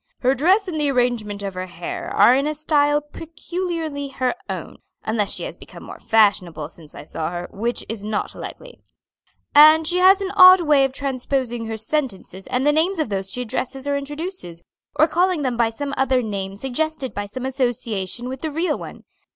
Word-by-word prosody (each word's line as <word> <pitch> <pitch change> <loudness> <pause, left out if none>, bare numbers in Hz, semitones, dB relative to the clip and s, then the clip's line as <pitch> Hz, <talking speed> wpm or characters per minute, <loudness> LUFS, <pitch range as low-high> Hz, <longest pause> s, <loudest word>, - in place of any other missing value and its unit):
"Her 255 +1 +3
dress 370 - +3
and 320 -4 -3
the 295 -1 +1
arrangement 240 -6 -1
of 195 -1 -4
her 185 0 -5
hair 175 -1 -6
are 245 - +5
in 275 +3 +1
a 305 - -2
style 295 -1 +2
peculiarly 325 -1 -5
her 260 -2 -1 0.2
own - - -6 0.3
(unless 215 -2 0
she - - -4
has - - -6
become - - -13
more - - -10
fashionable 180 -8 +2
since 160 -3 -13
I - - -9
saw 155 +1 -4
her, 175 0 -5
which 235 +4 -3
is 220 -2 -4
not 210 0 -2
likely); - - -10 0.7
and 310 +2 +7
she 360 +1 +1
has 380 +2 +6
an 390 -1 -3
odd 370 -2 +8
way 295 -4 +4
of 270 - -2
transposing 260 -3 -2
her 220 0 -4
sentences 220 - -3
and 255 +1 -1
the 295 - +4
names 340 +5 +1
of 310 -7 -1
those 195 -1 0
she 250 +6 -3
addresses 260 +3 -4
or 285 - +1
introduces, 290 - -5 0.3
or 310 +1 +4
calling 350 -1 +1
them 255 -3 -1
by 235 -1 +2
some 280 +5 -5
other 260 -1 +2
name 195 -3 -4
suggested 270 +4 -2
by 205 0 -4
some 255 +5 -6
association 245 -4 -2
with 260 0 -6
the 315 - -2
real 325 +4 -1
one. - - -10
265 Hz, 195 wpm, -21 LUFS, 220-310 Hz, 0.7 s, odd